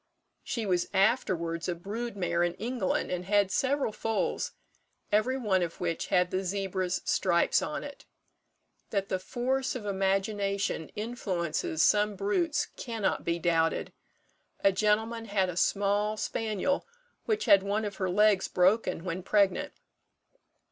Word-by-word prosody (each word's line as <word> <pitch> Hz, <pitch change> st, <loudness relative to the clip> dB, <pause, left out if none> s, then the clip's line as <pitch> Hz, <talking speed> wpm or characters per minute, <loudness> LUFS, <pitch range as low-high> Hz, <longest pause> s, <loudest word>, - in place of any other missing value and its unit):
She 230 Hz, -3 st, -3 dB
was 180 Hz, -3 st, +1 dB
afterwards 185 Hz, -6 st, +1 dB
a 175 Hz, -, -1 dB
brood 210 Hz, +5 st, -5 dB
mare 170 Hz, -2 st, 0 dB
in 175 Hz, 0 st, +1 dB
England, 235 Hz, -3 st, -1 dB
and 180 Hz, 0 st, -3 dB
had 200 Hz, 0 st, +2 dB
several 270 Hz, -1 st, +1 dB
foals, 220 Hz, +1 st, -2 dB, 0.6 s
every 220 Hz, +6 st, +2 dB
one 205 Hz, -7 st, +1 dB
of 170 Hz, -1 st, -3 dB
which 165 Hz, -2 st, -2 dB
had 180 Hz, -2 st, +2 dB
the 190 Hz, +1 st, -1 dB
zebra's 190 Hz, -1 st, -2 dB
stripes 175 Hz, -2 st, +2 dB
on 150 Hz, -, -3 dB
it. 285 Hz, 0 st, -10 dB, 0.8 s
That 195 Hz, -2 st, -1 dB
the 185 Hz, -, 0 dB
force 260 Hz, +7 st, -1 dB
of 235 Hz, -5 st, -5 dB
imagination 195 Hz, -2 st, 0 dB
influences 185 Hz, -8 st, -1 dB
some 210 Hz, 0 st, +3 dB
brutes 295 Hz, -, 0 dB
cannot 225 Hz, -5 st, -2 dB
be 170 Hz, 0 st, 0 dB
doubted. 165 Hz, -1 st, +1 dB, 0.7 s
A 195 Hz, -, +6 dB
gentleman 220 Hz, +3 st, +1 dB
had 200 Hz, -3 st, +1 dB
a 175 Hz, -, -5 dB
small 205 Hz, +3 st, +1 dB
spaniel 220 Hz, +5 st, -1 dB, 0.4 s
which 435 Hz, -1 st, 0 dB
had 195 Hz, -, +7 dB
one 205 Hz, +2 st, -1 dB
of 200 Hz, -2 st, -5 dB
her 185 Hz, -2 st, -1 dB
legs 205 Hz, +1 st, +4 dB
broken 185 Hz, -1 st, +2 dB
when 180 Hz, 0 st, -3 dB
pregnant. 200 Hz, 0 st, +2 dB
200 Hz, 140 wpm, -29 LUFS, 180-220 Hz, 0.8 s, had